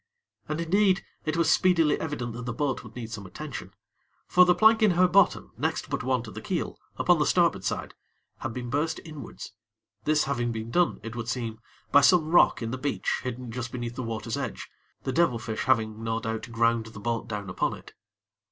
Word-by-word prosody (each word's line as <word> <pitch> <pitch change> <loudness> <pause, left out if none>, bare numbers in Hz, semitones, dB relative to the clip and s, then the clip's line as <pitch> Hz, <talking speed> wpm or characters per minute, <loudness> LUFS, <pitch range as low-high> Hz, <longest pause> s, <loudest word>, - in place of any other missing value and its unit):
And, 155 +1 -2
indeed, 190 +3 +2 0.2
it 155 +1 -1
was 170 - +3
speedily 170 -5 +4
evident 135 -7 -3
that 125 +1 -7
the 125 - -2
boat 135 +1 -1
would 110 -2 -13
need 115 -2 -6
some 100 -3 -6
attention; - - -7 0.5
for 180 0 +6
the 180 0 +4
plank 220 +1 +5
in 215 - +6
her 185 0 +6
bottom 195 +3 +3
next - - -2
but - - -1
one 130 -1 0
to 110 - -9
the - - -8
keel, - - -3 0.2
upon - - +4
the - - +3
starboard - - +3
side, - - -3 0.5
had - - -3
been 120 0 -5
burst 150 +4 0
inwards; 150 -9 -9 0.5
this 155 0 +3
having 120 -4 -1
been 110 0 -5
done, 175 +3 +2
it 115 +1 -6
would 115 -1 -4
seem, 115 -3 -3 0.3
by 145 - +7
some 160 0 +4
rock 175 -7 +5
in 115 - -3
the 130 - -4
beach 140 +2 -1
hidden 125 -1 -5
just 120 0 -4
beneath 120 -1 -4
the 130 - -5
water's 115 -1 -3
edge, - - -5 0.3
the 130 - -2
devil 165 -7 +3
fish 110 -1 -4
having, 110 -3 +1
no 115 0 -1
doubt, 110 +1 -4
ground 115 -1 +2
the 110 -2 -10
boat 115 +2 -2
down 105 -3 -4
upon 90 - -1
it. - - -15
125 Hz, 205 wpm, -27 LUFS, 115-155 Hz, 0.5 s, by